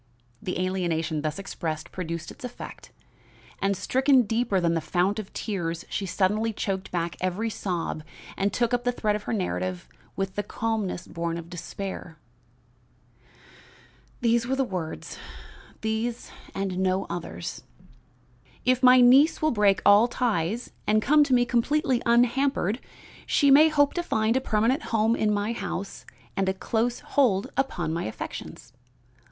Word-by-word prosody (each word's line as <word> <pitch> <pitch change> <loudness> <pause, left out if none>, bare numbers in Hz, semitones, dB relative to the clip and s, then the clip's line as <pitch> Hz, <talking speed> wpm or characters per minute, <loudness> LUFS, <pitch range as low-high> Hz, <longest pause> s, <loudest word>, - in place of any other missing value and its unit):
The 180 - -3
alienation 170 -4 -1
thus 155 +2 -2
expressed 160 -5 -5
produced 170 -2 -5
its - - -14
effect, 245 -1 -8 0.7
and, 195 -1 +1
stricken 260 +6 +3
deeper 225 -2 +1
than 170 -1 +1
the 165 - 0
fount 180 +7 0
of 210 - -7
tears, 170 -6 -3
she 195 - -3
suddenly 210 +5 +1
choked 195 -2 -3
back 170 -2 -2
every 190 +5 -1
sob 175 -6 -3 0.3
and 200 +1 0
took 235 +3 0
up 245 0 +1
the 245 - +2
thread 215 -4 0
of 210 - -3
her - - -3
narrative 185 -2 -2 0.3
with 195 -1 -2
the 205 - -1
calmness 210 -3 -2
born 170 0 -3
of 170 0 -9
despair, 175 -1 -6 2.0
"These 235 0 +2
were 265 - +1
the 270 - +1
words, 180 -9 -5 0.6
these 220 +2 -2 0.2
and 195 -2 -2
no 190 0 +1
others: 160 - -5 1.0
"'If 255 0 +3
my 255 -1 +7
niece 265 +6 +6
will 310 0 +2
break 205 -4 +3
all 205 +3 +7
ties 230 -3 -1 0.2
and 215 0 +4
come 300 +3 +5
to 270 - 0
me 245 0 +4
completely 255 +2 +1
unhampered, 240 -2 +2 0.5
she 285 -2 +4
may 305 +3 +8
hope 290 -2 +3
to 350 - -1
find 220 -8 +1
a 260 - +2
permanent 230 +4 +1
home 225 +1 +2
in 215 -2 +1
my 205 +2 0
house 200 -2 -5 0.3
and 195 -1 +1
a 190 - -1
close 235 +4 -1
hold 220 -9 +1
upon 175 -12 -1
my 170 - -2
affections. 120 +2 -7
205 Hz, 150 wpm, -26 LUFS, 180-245 Hz, 2.0 s, may